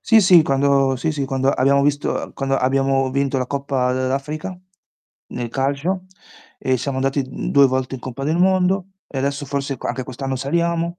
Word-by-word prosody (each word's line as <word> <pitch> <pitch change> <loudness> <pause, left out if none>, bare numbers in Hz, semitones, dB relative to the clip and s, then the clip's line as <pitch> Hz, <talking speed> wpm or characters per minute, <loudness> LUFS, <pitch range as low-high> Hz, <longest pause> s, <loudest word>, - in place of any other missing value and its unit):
Sì, 225 -1 +5
sì, 180 -4 +7
quando 135 -1 +2
sì, 155 +5 -1
sì, 145 -2 -2
quando 135 0 +1
abbiamo 140 +1 +3
visto 145 0 +1
uhm, - - -4
quando 135 0 -1
abbiamo 135 0 +1
vinto 140 0 0
la 125 - -2
Coppa 135 -2 -1
dell'Africa 140 +7 -3 0.7
nel 120 -1 -4
calcio 140 +9 -1 0.5
e 130 0 +1
siamo 130 +2 -3
andati, 135 +1 0
mhmm, - - -5
2 140 -1 +6
volte 130 0 -2
in 130 - -7
Coppa 130 +2 -6
del 155 +3 +1
Mondo 185 +1 +2 0.2
e 135 - -6
adesso 140 +1 -2
forse 140 0 -3
c - - -15
anche 130 - -2
quest'anno 135 +1 -4
saliamo. 170 +5 -1
140 Hz, 185 wpm, -20 LUFS, 135-150 Hz, 0.7 s, sì